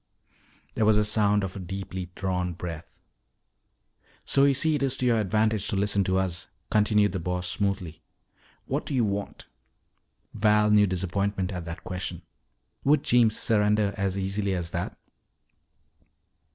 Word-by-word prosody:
There - - 0
was 110 0 +5
the 105 - +3
sound 105 -1 +2
of 95 -1 -4
a - - -5
deeply 95 -1 -6
drawn 90 -2 -2
breath. 85 -1 -7 1.4
"So 140 0 +4
you 140 -1 +3
see 160 +4 +3
it 150 - -1
is 135 -2 +1
to 125 - -1
your 120 -2 +3
advantage 110 0 +1
to - - -2
listen 100 0 +2
to 95 0 +1
us," 95 -2 -2 0.2
continued 105 -1 +3
the 95 - -3
Boss 90 +1 -2
smoothly. 90 -4 -2 0.6
"What - - -3
do 140 - -2
you 120 -3 +2
want?" 100 0 -4 0.9
Val 105 -1 +3
knew 105 -1 +5
disappointment 95 +1 -1
at 90 -3 -5
that 85 +3 -7
question. 90 0 -5 0.6
Would 145 +1 +3
Jeems 115 -3 +3
surrender 105 -1 +2
as 100 -2 -1
easily 95 0 -1
as 90 -1 -3
that? 85 +2 -4
100 Hz, 150 wpm, -26 LUFS, 90-105 Hz, 1.4 s, was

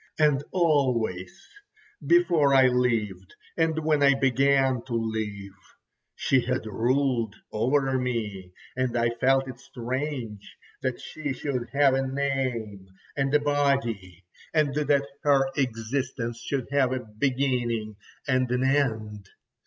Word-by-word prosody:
And 150 -3 +3
always, 125 - 0 0.6
before 165 - +4
I 130 -1 +7
lived 115 -7 0 0.2
and 160 -1 +1
when 155 -2 +2
I 140 -1 +5
began 135 -1 +2
to 125 - -6
live, 110 -3 -3 0.6
she 135 -1 +2
had 125 0 -2
ruled 120 0 0 0.2
over 130 +4 +1
me, 105 -7 -3 0.2
and 130 -2 -1
I 115 0 +2
felt 135 +3 +2
it 125 -2 -8
strange 125 -4 -5 0.2
that 130 -2 -2
she 150 -3 -5
should 130 -3 -3
have 140 -1 +4
a 135 0 0
name 130 -8 -2 0.3
and 135 -1 0
a 150 - +4
body, 135 - -1 0.3
and 150 -3 +2
that 145 -1 +1 0.2
her 140 -2 +4
existence 120 -1 -2
should 130 +1 -3
have 135 -2 +2
a 130 -1 -4
beginning 125 -5 0 0.3
and 130 -2 +1
an 125 +1 0
end. 110 -7 -1
130 Hz, 125 wpm, -26 LUFS, 115-140 Hz, 0.6 s, I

